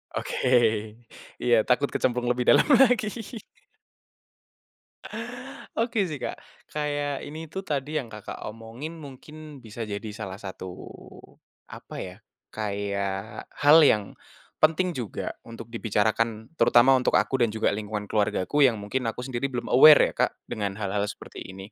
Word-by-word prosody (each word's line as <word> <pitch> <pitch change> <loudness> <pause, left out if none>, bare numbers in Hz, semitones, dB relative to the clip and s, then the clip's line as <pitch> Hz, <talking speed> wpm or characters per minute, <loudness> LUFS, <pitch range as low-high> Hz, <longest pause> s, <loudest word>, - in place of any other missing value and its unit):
Oke, - - -3 1.0
iya, 120 -1 +3
takut 135 +3 +3
kecemplung 125 -1 -1
lebih 125 0 +1
dalam - - +5 0.2
lagi. 245 -4 +2 2.7
Oke 230 -2 +1
sih, 155 -6 -4
Kak, - - -4 0.3
kayak 145 -1 -2
ini 160 +2 -7
tuh 190 +5 -6
tadi 150 -3 -3
yang 130 -7 -3
Kakak 105 -1 -8
omongin 115 +7 -7
mungkin 150 +1 -11
bisa 115 0 -7
jadi 100 +1 -5
salah 100 -3 -6
satu 95 -2 -8 1.0
apa - - -10
ya, - - -6 0.4
kayak 100 0 -4
hal 150 +3 +7
yang 110 -10 +4 0.5
penting 165 +4 +3
juga 120 - -4 0.2
untuk 115 0 -10
dibicarakan 110 0 -1
terutama 120 +2 +6
untuk 130 -1 +3
aku 135 - +2
dan 120 -2 +3
juga 110 - +1
lingkungan 105 0 -4
keluargaku 105 +5 0
yang 120 - 0
mungkin 110 +4 -3
aku 115 +2 -4
sendiri 130 +1 -2
belum 125 -3 -5
aware 150 +4 +8
ya, - - -21
Kak, - - -21
dengan 100 -2 -4
hal-hal 100 0 -2
seperti - - -9
ini. 95 +2 -10
120 Hz, 140 wpm, -26 LUFS, 105-145 Hz, 2.7 s, aware